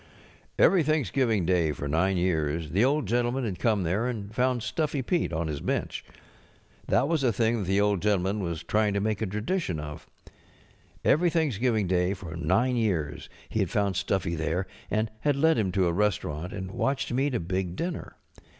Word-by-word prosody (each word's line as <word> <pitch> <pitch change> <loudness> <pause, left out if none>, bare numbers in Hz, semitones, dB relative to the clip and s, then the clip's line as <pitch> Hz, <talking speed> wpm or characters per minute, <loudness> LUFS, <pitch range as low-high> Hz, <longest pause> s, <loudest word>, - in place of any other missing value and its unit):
Every 190 -3 +5
Thanksgiving 135 - +1
Day 85 -3 +2
for 70 - -5
nine 90 +6 +1
years 80 -3 0
the 95 +5 +2
(Hd 140 +2 +2
Gentleman 120 +4 0
had 95 -6 -4
come 105 0 +2
there 95 +8 0
and 110 -4 -5
found 125 -1 +1
Stuffy 150 -4 -1
Pete 170 - 0
on 85 0 -1
his 75 -3 -4
bench. - - -2 0.8
That 135 - +3
was 160 -3 +1
a 125 - +4
thing 115 +2 +1
that - - -2
the 95 +2 +2
Old 100 -3 +2
Gentleman 100 0 +1
was 85 -3 -3
trying 105 +3 +1
to - - +2
make 105 +1 -1
a 110 - 0
tradition 105 - -2
of. 75 0 -8 1.0
Every 175 +4 +4
Thanks┬¼ 155 - 0
giving 115 -4 +2
Day 90 +1 +1
for 90 -4 -8
nine 125 +9 +1
years 85 -10 -1 0.2
he - - -2
had - - +1
found 100 -2 0
Stuffy 95 -2 0
there, 80 +3 -1 0.2
and 110 +1 0
had 145 +5 +1
led 160 +1 +3
him 95 -4 0
to 95 -1 +2
a 85 - +1
restaurant 90 -4 -1
and 95 -2 -5
watched 140 +5 -1
him 125 - 0
eat 140 -1 +1
a - - +1
big 90 +1 -2
dinner. 170 - -4
105 Hz, 195 wpm, -27 LUFS, 90-125 Hz, 1.0 s, Every